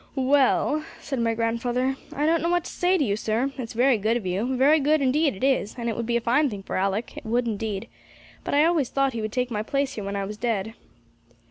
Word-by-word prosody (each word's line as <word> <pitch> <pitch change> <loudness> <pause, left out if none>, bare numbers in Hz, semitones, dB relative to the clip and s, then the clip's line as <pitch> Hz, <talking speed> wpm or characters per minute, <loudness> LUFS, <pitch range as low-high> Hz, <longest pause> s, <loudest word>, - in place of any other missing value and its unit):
'Well,' 280 +3 +2 0.2
said 270 -3 -4
my 230 -1 +1
grandfather, 240 +3 0 0.2
'I 290 - -1
don't 330 +1 +2
know 335 - 0
what 350 -1 +1
to - - -6
say 360 +1 +2
to 310 - +1
you, 205 -6 0
sir; 225 +5 -1
it's 230 -3 -5
very 245 0 +3
good 220 +4 +1
of 225 - -7
you 215 +9 -1
very 290 +5 +5
good, 300 +2 +3
indeed 280 0 +2
it 190 - -9
is, 265 -6 +1
and 235 -1 -3
it 225 - -1
would 235 0 -3
be 235 0 +2
a - - -2
fine 260 +6 +2
thing 200 -4 -7
for - - -5
Alick, 195 +4 -1
it - - -8
would 240 +2 +1
indeed; 210 -2 -3 0.6
but - - -2
I 295 +2 +5
always 325 -7 +2
thought 275 -1 +1
he 230 - -3
would 215 0 -3
take 250 +1 -1
my 210 -2 -1
place 275 +4 -1
here 210 - -5
when 200 0 -4
I 200 0 -2
was 210 +2 -7
dead.' 220 -2 -2
240 Hz, 255 wpm, -25 LUFS, 220-275 Hz, 0.6 s, very